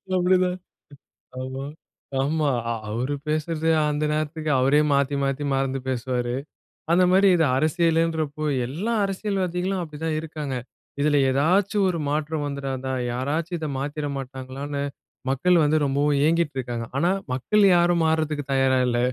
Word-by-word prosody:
அப்படிதான். 180 0 +2 0.8
ஆமா 130 +1 -5 0.6
ஆமா. 150 +1 +1 0.2
அ - - +1 0.2
அவரு 125 +6 -2
பேசுறது 155 +1 -1 0.2
அந்த 150 +1 -1
நேரத்துக்கு 155 0 -2
அவரே 140 +3 +4
மாத்தி, 140 0 +2
மாத்தி, 135 +1 -1
மறந்து 135 0 0
பேசுவாரு. 125 -1 -1 0.6
அந்த 180 +1 +5
மாரி 195 +1 +5
இது 165 - +3
அரசியல்ன்றப்போ, 160 -1 +1 0.2
எல்லா 185 - -3
அரசியல்வாதிகளும் 190 -2 -1
அப்படி 150 -3 -8
தான் 155 -1 0
இருக்காங்க. 150 -4 -5 0.5
இதுல 145 -1 +3
ஏதாச்சும் 190 +8 +2
ஒரு 170 - -3
மாற்றம் 150 0 -1
வந்துடாதா? 135 -2 -3 0.2
யாராச்சும் 155 +8 -2
இத 155 -1 -4
மாத்திட 145 +2 -3
மாட்டாங்களான்னு, 135 +2 -5 0.5
மக்கள் 175 +7 +3
வந்து 155 +1 +3
ரொம்பவும் 140 +1 +1
ஏங்கிட்டு 165 -4 +1
இருக்காங்க. 120 -2 -3
ஆனா 175 +4 +2 0.2
மக்கள் 205 +11 +2
யாரும் 175 -1 +3
மாறுறதுக்கு 155 -2 0
தயாரா 135 -1 +3
இல்ல. 120 0 0
150 Hz, 130 wpm, -24 LUFS, 135-170 Hz, 0.8 s, அந்த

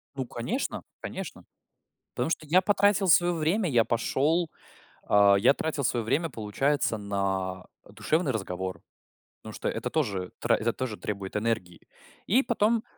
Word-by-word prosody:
Ну, 130 - -3
конечно 155 - -3 0.2
конечно. - - -7 0.7
Потому - - -1
что 155 - -2
я 180 +5 +5
потратил 200 -1 +3
своё 175 +1 +5
время, 170 +5 +1
я 115 -3 +4
пошёл. 150 +8 +1 0.6
А, 100 -1 +6
я 115 +7 +5
тратил 150 -1 -2
своё 120 -2 0
время, 160 +8 +1
получается, 115 +2 0
на, 95 -2 -2 0.2
э, - - -16
душевный 155 -2 0
разговор. 95 -4 -4 0.6
Потому - - -9
что - - -2
это - - -3
тоже 100 - -1
тра - - +3
это 115 +1 -1
тоже 125 -5 -4
требует 100 -2 -5
энергии. 105 -6 -3 0.4
И 255 +8 +4
потом, 225 0 +1
125 Hz, 150 wpm, -27 LUFS, 100-165 Hz, 0.7 s, А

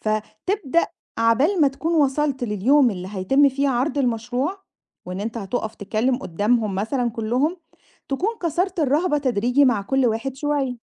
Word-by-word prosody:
فتبدأ 265 - -1 0.3
عبال 260 - +3
ما 290 - +6
تكُون 315 +5 -3
وصَلت 285 -3 +1
لليوم 240 +6 +3
اللي 185 -2 -6
هيتم 270 +10 +3
فيه 275 +1 0
عرض 265 +3 0
المشروع، 250 - -1 0.4
وإن 180 +1 -5
أنت 225 +2 -4
هتقف 220 +1 -3
تتكلم 225 +5 0
قدّامهم 210 0 0
مثلًا 235 +5 -1
كُلّهم، 245 +9 -1 0.5
تكُون 335 +10 0
كسَرت 350 +2 -1
الرهبة 295 +2 +2
تدريجي 250 0 +2
مع 235 -6 +2
كُلّ 265 +5 +1
واحد 230 +4 -2
شوية. 275 -3 -1
255 Hz, 145 wpm, -22 LUFS, 220-290 Hz, 0.5 s, ما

